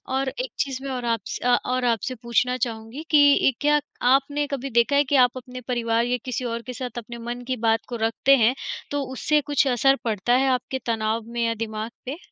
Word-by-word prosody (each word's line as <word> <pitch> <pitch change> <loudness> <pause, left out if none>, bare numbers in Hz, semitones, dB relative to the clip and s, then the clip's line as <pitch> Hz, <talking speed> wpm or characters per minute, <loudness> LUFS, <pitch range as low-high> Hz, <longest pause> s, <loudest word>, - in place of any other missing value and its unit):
और 265 0 0
एक - - -3
चीज़ 270 -2 -2
मैं 275 - -4
और 250 -2 -4
आप 230 -1 +1
स - - -4
अ, 245 0 +4
और 255 0 0
आपसे 245 +2 0
पूछना 250 +2 +1
चाहूँगी 225 +3 -4
कि 285 -2 +5
क्या 295 0 +4 0.3
आपने 285 +2 +1
कभी 275 -1 -4
देखा 250 +4 +2
है 285 - +5
कि 285 +1 0
आप 250 +1 -5
अपने 250 0 -8
परिवार 235 -2 +1
या 250 0 0
किसी 255 0 -3
और 235 -1 -3
के 250 - -7
साथ 245 -1 -6
अपने 235 0 -7
मन 245 +1 -5
की 255 -1 -1
बात 225 0 +2
को 245 - -4
रखते 265 +4 +4
हैं, 230 +1 +4 0.4
तो 285 -1 -1
उससे 300 +3 +1
कुछ 290 0 +1
असर 265 +2 +4
पड़ता 225 +1 0
है 265 +2 +3
आपके 255 +1 -2
तनाव 225 -1 -1
में 235 0 -2
या 230 - +1
दिमाग 220 +1 -5
पे? 270 +5 -4
250 Hz, 225 wpm, -24 LUFS, 235-270 Hz, 0.4 s, कि